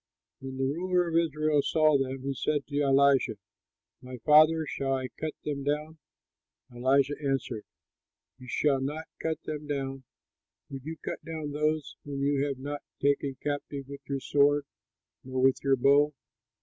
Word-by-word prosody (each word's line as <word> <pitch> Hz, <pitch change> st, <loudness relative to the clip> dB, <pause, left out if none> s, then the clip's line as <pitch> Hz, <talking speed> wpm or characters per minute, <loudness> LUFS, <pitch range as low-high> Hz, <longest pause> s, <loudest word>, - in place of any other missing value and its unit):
When 130 Hz, 0 st, -7 dB
the 135 Hz, -, -1 dB
ruler 175 Hz, +6 st, +1 dB
of 165 Hz, -, -3 dB
Israel 155 Hz, -2 st, +2 dB
saw 155 Hz, 0 st, +3 dB
them, 135 Hz, -1 st, -1 dB
he 135 Hz, 0 st, -1 dB
said 145 Hz, +1 st, -1 dB
to 145 Hz, 0 st, -1 dB
Elisha, 140 Hz, -2 st, +4 dB, 0.7 s
"My 125 Hz, -1 st, -8 dB
father, 155 Hz, +1 st, +6 dB
shall 135 Hz, -2 st, -2 dB
I 130 Hz, -1 st, -3 dB
cut 155 Hz, +6 st, -5 dB
them 140 Hz, -2 st, -2 dB
down?" 150 Hz, +2 st, -2 dB, 0.7 s
Elisha 135 Hz, +3 st, +2 dB
answered, 135 Hz, -5 st, -2 dB, 0.7 s
"You 125 Hz, -, -12 dB
shall 135 Hz, +2 st, +1 dB
not 150 Hz, +4 st, -3 dB, 0.2 s
cut 160 Hz, -1 st, -2 dB
them 150 Hz, -1 st, -5 dB
down; 135 Hz, -2 st, -3 dB, 0.7 s
would 135 Hz, -1 st, -7 dB
you 160 Hz, +1 st, -5 dB
cut -, -, -5 dB
down 155 Hz, -2 st, -5 dB
those 150 Hz, 0 st, -1 dB
whom 140 Hz, -1 st, -4 dB
you 140 Hz, 0 st, +2 dB
have 140 Hz, -2 st, -3 dB
not 145 Hz, +2 st, -5 dB, 0.2 s
taken 140 Hz, -1 st, +1 dB
captive 145 Hz, -1 st, -3 dB
with 140 Hz, 0 st, -9 dB
your 135 Hz, -1 st, -2 dB
sword 145 Hz, +1 st, +3 dB, 0.6 s
nor 130 Hz, 0 st, -4 dB
with 130 Hz, 0 st, +3 dB
your 135 Hz, -1 st, +4 dB
bow? 140 Hz, +3 st, +4 dB
140 Hz, 160 wpm, -29 LUFS, 135-150 Hz, 0.7 s, father